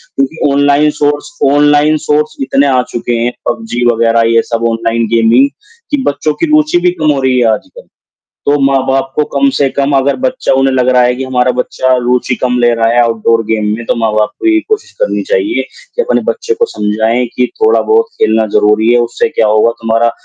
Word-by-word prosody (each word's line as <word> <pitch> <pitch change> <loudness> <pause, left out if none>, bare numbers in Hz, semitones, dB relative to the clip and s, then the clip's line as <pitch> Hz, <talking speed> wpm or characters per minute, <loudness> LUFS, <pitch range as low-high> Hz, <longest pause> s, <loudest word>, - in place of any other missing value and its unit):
क्योंकि 135 +2 -1
online 145 +1 +2
source, 145 0 -3
online 145 +1 +3
source 150 0 -1
इतने 135 +1 +1
आ 130 -2 +2
चुके 120 0 -3
हैं, 120 +1 -1 0.2
पबजी 220 - -3
वग़ैरह 115 0 +1
ये 115 - +4
सब 115 -1 -3
ऑनलाइन 115 0 -1
गेमिंग 115 +4 +3 0.4
कि 290 - +1
बच्चों 150 +2 -1
की 330 - -2
रुचि 305 -8 +3
भी 180 - +4
कम 155 -4 0
हो 140 - -1
रही 130 -1 +1
है 120 - +2
आजकल। - - -9 0.6
तो 145 +1 +2
माँ 135 0 +2
बाप 135 0 -1
को 150 - +2
कम 140 0 +3
से 140 -1 +2
कम 140 +1 -1
अगर 135 +1 +1
बच्चा 260 +1 0
उन्हें 135 0 +1
लग 125 -1 +1
रहा 125 -1 +4
है 125 0 +2
कि 135 - -4
हमारा 125 -1 0
बच्चा 130 +1 0
रुचि 125 +1 0
कम 125 -1 -1
ले 120 0 +3
रहा 115 0 +1
है 120 - +3
आउटडोर 115 0 +1
गेम 110 -1 0
में, 120 - -8
तो - - 0
माँ 110 -2 -1
बाप 105 0 +1
को 340 - -2
ये 330 -1 +3
कोशिश 435 -1 -2
करनी - - -1
चाहिए 360 -10 0 0.3
कि 485 - +2
अपने - - 0
बच्चे 465 -2 -3
को 470 +1 0
समझाएँ 110 - -1
कि 125 0 +2 0.2
थोड़ा 440 +1 +3
बहुत 445 +1 +2 0.2
खेलना 110 0 +2
ज़रूरी 105 +2 +3
है, 120 - +3
उससे 120 +6 -1
क्या 115 -7 0
होगा 110 +2 +3
तुम्हारा 115 +1 +1
130 Hz, 215 wpm, -11 LUFS, 115-150 Hz, 0.6 s, ये